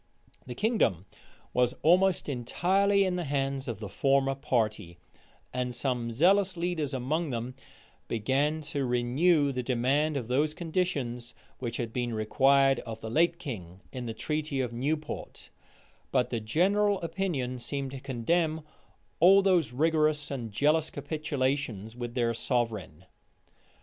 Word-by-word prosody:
The 125 - -6
kingdom 200 - +1 0.5
was 125 0 +2
almost 185 +3 +4
entirely 190 +10 +2
in 185 -2 0
the 175 - -2
hands 135 -1 -1
of 115 -4 -4
the 105 - -5
former 135 +5 +2
party; 110 -9 -1 0.6
and 125 -1 -2
some 125 -2 -1
zealous 185 - +3
leaders 170 -4 -1
among 150 +6 -1
them 120 0 -4 0.5
began 135 +7 0
to 140 -2 0
renew 140 +5 +2
the 125 -1 -2
demand 135 +5 +1
of 120 -5 -4
those 150 +5 +1
conditions 140 -9 -2 0.2
which 120 -2 -4
had 115 -2 -4
been 120 -2 -2
required 135 +4 +3
of 115 -1 -7
the 110 - -6
late 170 +5 +3
king 100 - -7
in 125 -2 -5
the 115 - -4
treaty 150 +1 -2
of 125 -3 -2
Newport: 150 +6 -4 0.6
but 125 - +1
the 120 - -1
general 195 - +2
opinion 155 -8 -2
seemed 135 +2 -4
to 135 - -6
condemn 155 +6 0 0.6
all 195 +4 +7
those 175 - +3
rigorous 155 +1 +1
and 120 -5 -4
jealous 150 +8 +2
capitulations 140 -7 -2
with 120 -1 -6
their 120 -2 +1
sovereign. 115 - -2
135 Hz, 140 wpm, -29 LUFS, 120-160 Hz, 0.6 s, all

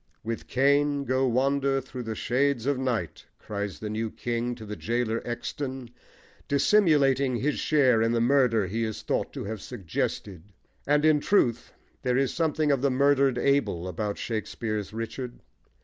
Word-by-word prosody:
"With 115 0 -4
Cain 140 +2 +2
go 130 0 +1
wander 135 +2 +1
through 130 -1 -7
the 110 -2 -4
shades 130 +1 0
of 140 -2 +1
night!" 115 - -3
cries 100 -1 -5
the 105 - -5
new 110 +1 -2
king 120 +2 -3
to 110 -2 -10
the 105 0 -6
gaoler 115 +1 -1
Exton, 130 +1 -5 0.6
dissimulating 140 -5 +3
his 145 +5 -1
share 130 -7 +3
in 115 0 +2
the 120 - +1
murder 120 -4 +3
he 110 +6 -2
is 110 -1 -4
thought - - -1
to - - -5
have 105 -1 -5
suggested; 90 0 -4 0.5
and 150 +1 +3
in 155 -1 +5
truth 125 - +1 0.3
there 125 -1 +1
is 135 -1 +1
something 155 -2 +1
of 135 -3 +1
the 140 - +3
murdered 135 -1 +3
Abel 130 -11 +1
about 100 +3 -3
Shakespeare's 110 -2 -3
Richard. 115 +3 -5
125 Hz, 160 wpm, -27 LUFS, 110-140 Hz, 0.6 s, in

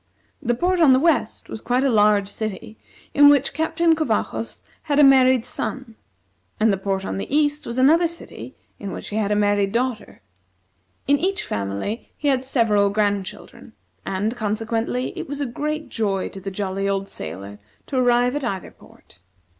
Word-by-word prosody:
The 240 -3 0
port 360 +7 +1
on 300 -6 +6
the 260 - +4
west 290 -7 0
was 220 - -7
quite 250 +2 0
a 275 - +3
large 210 -2 +4
city, 215 +1 -6 0.3
in 285 0 +7
which 285 -1 +3
Captain 325 +2 +2
Covajos 230 -6 -2 0.2
had 290 -2 -1
a 295 - +7
married 260 -3 +5
son, 260 -4 -4 0.7
and 215 -1 +3
the - - 0
port 195 0 -2
on - - -3
the 195 - -5
east 295 0 +1
was 235 - -5
another 320 +7 +5
city 335 +1 -9 0.2
in 200 -2 -6
which - - -7
he 210 - -3
had 210 -2 0
a - - +3
married 205 -1 +2
daughter. 235 - -3 0.8
In 285 +1 +3
each 385 +4 -1
family 100 - -4
he 290 - 0
had 260 -2 +1
several 225 -6 +2
grandchildren; 200 -1 -3 0.3
and, 205 +5 -2
consequently, 225 +3 -2
it - - -6
was 285 0 -4
a 285 - -1
great 300 +5 -4
joy 200 -4 -1
to 195 - -10
the 195 - -4
jolly 195 0 -2
old 195 0 -1
sailor 100 - -8 0.3
to - - -6
arrive 245 +1 +3
at 290 - -3
either 190 -6 -4
port. 85 - -21
230 Hz, 180 wpm, -22 LUFS, 200-280 Hz, 0.8 s, in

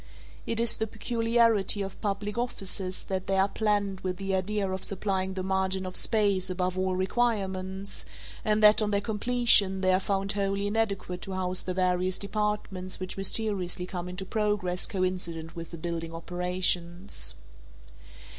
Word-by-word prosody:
It 230 - -1
is 235 -1 +4
the 220 - -1
peculiarity 230 -3 +2
of 195 - -8
public 205 0 -2
offices 195 -6 -3
that 190 -1 -3
they 195 - +1
are 190 +1 +4
planned 205 -2 0
with 185 -1 -3
the 195 0 -3
idea 195 +2 0
of 190 0 -4
supplying 190 -1 0
the 185 - -3
margin 190 0 0
of 185 - -6
space 200 -4 +3
above 185 0 -1
all 185 0 0
requirements 190 -2 -1 0.4
and 215 0 +2
that 210 +1 +8
on 210 - +1
their 200 -1 +2
completion 210 -3 +3
they 185 -1 +3
are 185 - +4
found 195 0 -1
wholly 200 0 -1
inadequate 205 -4 -1
to 195 - -5
house 185 -1 0
the 185 - -4
various 185 0 +1
departments 200 -3 -3
which 185 0 -5
mysteriously 195 -3 0
come 180 -1 -5
into 180 +1 -5
progress 205 -3 0
coincident 180 -4 -2
with 165 -1 -7
the 170 - -8
building 165 0 -4
operations. 180 +1 -1
190 Hz, 155 wpm, -28 LUFS, 185-210 Hz, 0.4 s, that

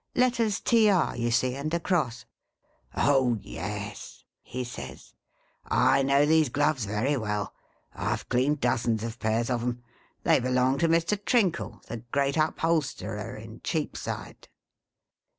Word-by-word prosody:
Letters 235 -4 +2
TR, 210 -7 +3
you 120 0 -1
see, 125 +2 +2
and 140 +4 -4
a - - +1
cross.' 125 - -1 0.4
' - - -40 0.2
Oh 130 -5 +3
yes,' - - -6 0.2
he 130 +1 -5
says, 120 - -9 0.3
' - - -40 0.3
I - - +4
know 140 +1 +4
these 155 -2 +4
gloves 145 -2 +1
very 105 +8 0
well; 105 -3 -2 0.4
I - - -1
Ve - - -8
cleaned 135 +4 +1
dozens 115 -3 +1
of 115 +1 -5
pairs 115 +2 0
of 120 -1 0
'em. 120 0 -3 0.4
They - - +4
belong 130 +1 +1
to 170 - +3
Mr. 170 +5 +1
Trinkle, 200 -9 0
the 115 - -5
great 140 +5 -1
upholsterer 155 -9 -1
in 110 +1 -11
Cheapside.' 160 -3 -4
130 Hz, 145 wpm, -27 LUFS, 120-160 Hz, 0.4 s, I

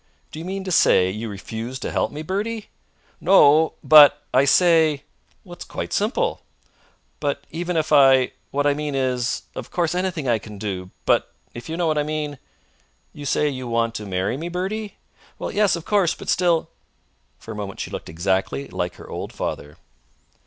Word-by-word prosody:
"Do 155 - -8
you 165 - -7
mean 190 +1 -4
to 190 - -4
say 95 - +4
you 110 +3 -5
refuse 110 +5 -6
to - - -5
help - - 0
me, 150 +2 -6
Bertie?" 210 +5 -3 0.5
"No; 160 -4 +5
but 150 -1 +8
I 130 +2 +5
say!" 160 -2 +4 0.4
"It's 175 -1 -9
quite - - -6
simple." 280 - 0 0.8
"But 140 -1 -2
even 175 +1 -2
if 155 -1 0
I 135 -3 +6 0.2
What 145 +1 -1
I 145 - +4
mean 150 -1 -3
is 125 -2 -1
Of - - -7
course, 170 -2 0
anything 180 -5 -2
I 115 -2 +2
can 105 -1 -11
do 95 -3 -5 0.2
but - - +2 0.2
if 120 +6 -9
you 165 - -3
know 175 - 0
what 155 -2 +1
I - - +1
mean 150 -2 -4 0.4
" - - -40
"You 145 -1 -7
say 150 - +2
you 130 -3 -4
want 115 0 0
to 105 -2 -6
marry 95 +6 -1
me, 165 +4 -5
Bertie?" 195 +4 -4 0.4
"Yes, 205 -2 +1
of 170 - -7
course; 200 -5 +2
but - - -9
still 175 -3 +2 0.3
" - - -43
For 115 - -10
a - - -6
moment 100 -2 -6
she - - -5
looked - - -6
exactly 85 -5 -1
like - - -3
her - - -12
old - - -6
father. 75 +1 -5
145 Hz, 190 wpm, -22 LUFS, 115-175 Hz, 0.8 s, but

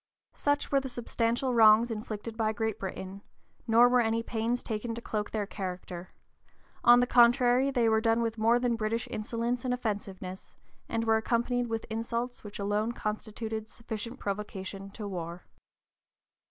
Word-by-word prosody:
Such 290 0 0
were 275 - +4
the 265 -1 -5
substantial 240 +1 -1
wrongs 225 +1 +6
inflicted 220 0 -5
by 220 -1 0
Great 220 0 -2
Britain; 190 0 -6 0.5
nor 230 +2 +7
were 250 0 +4
any 225 0 0
pains 230 +1 -1
taken 225 +1 -3
to - - -5
cloak 210 -2 -3
their 210 -2 -2
character; 185 -2 -6 0.7
on 240 +1 +8
the - - +4
contrary, 245 +2 +5
they 245 -4 +2
were 220 0 +3
done 225 0 +2
with 230 -1 -2
more 230 +2 +4
than 245 -1 +1
British 225 +1 -2
insolence 235 +2 -2
and 250 -1 0
offensiveness, 195 -5 -5 0.3
and 230 0 0
were 225 -1 +3
accompanied 240 +2 0
with 225 -1 -3
insults 235 +2 -3
which 205 -1 -8
alone 210 +3 0
(p. - - -16
045) - - -13
constituted 220 +1 -4
sufficient 230 +2 -6
provocation 195 -1 -5
to 205 +1 -7
war. 175 -2 -6
225 Hz, 165 wpm, -30 LUFS, 210-240 Hz, 0.7 s, on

